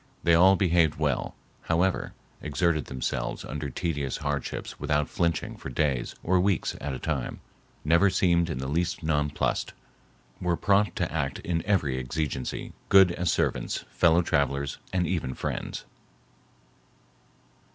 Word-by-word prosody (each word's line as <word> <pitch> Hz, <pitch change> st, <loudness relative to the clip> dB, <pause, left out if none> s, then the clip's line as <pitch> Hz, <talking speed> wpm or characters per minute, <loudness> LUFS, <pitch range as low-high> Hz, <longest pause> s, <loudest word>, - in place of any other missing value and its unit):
They 85 Hz, -, +4 dB
all 95 Hz, +4 st, +7 dB
behaved 85 Hz, -5 st, +3 dB
well, 75 Hz, -5 st, -1 dB, 0.3 s
however, 90 Hz, +3 st, 0 dB, 0.3 s
exerted 75 Hz, 0 st, 0 dB
themselves 65 Hz, -1 st, -3 dB
under 75 Hz, -1 st, -4 dB
tedious 70 Hz, -1 st, -2 dB
hardships 75 Hz, -2 st, -4 dB
without 75 Hz, 0 st, +1 dB
flinching 85 Hz, -2 st, -1 dB
for -, -, -7 dB
days 65 Hz, -2 st, -1 dB
or 90 Hz, +1 st, +3 dB
weeks 95 Hz, -1 st, +1 dB
at 70 Hz, -2 st, -3 dB
a -, -, -4 dB
time; 70 Hz, -3 st, -3 dB, 0.5 s
never 85 Hz, +6 st, +5 dB
seemed 85 Hz, -2 st, +2 dB
in 75 Hz, -, -3 dB
the 65 Hz, +1 st, -3 dB
least 85 Hz, +4 st, -1 dB
nonplussed; 75 Hz, -2 st, 0 dB, 0.7 s
were 85 Hz, -1 st, +1 dB
prompt 100 Hz, -2 st, +2 dB
to 85 Hz, -3 st, -2 dB
act 70 Hz, -4 st, -1 dB
in 85 Hz, -2 st, -1 dB
every 75 Hz, -11 st, +1 dB
exigency; 65 Hz, 0 st, -3 dB, 0.2 s
good 95 Hz, -2 st, +7 dB
as 90 Hz, 0 st, 0 dB
servants, -, -, -1 dB
fellow 85 Hz, +1 st, +4 dB
travelers, 70 Hz, -2 st, 0 dB
and 90 Hz, -2 st, +1 dB
even 80 Hz, -7 st, -2 dB
friends. -, -, -4 dB
80 Hz, 135 wpm, -27 LUFS, 70-90 Hz, 0.7 s, all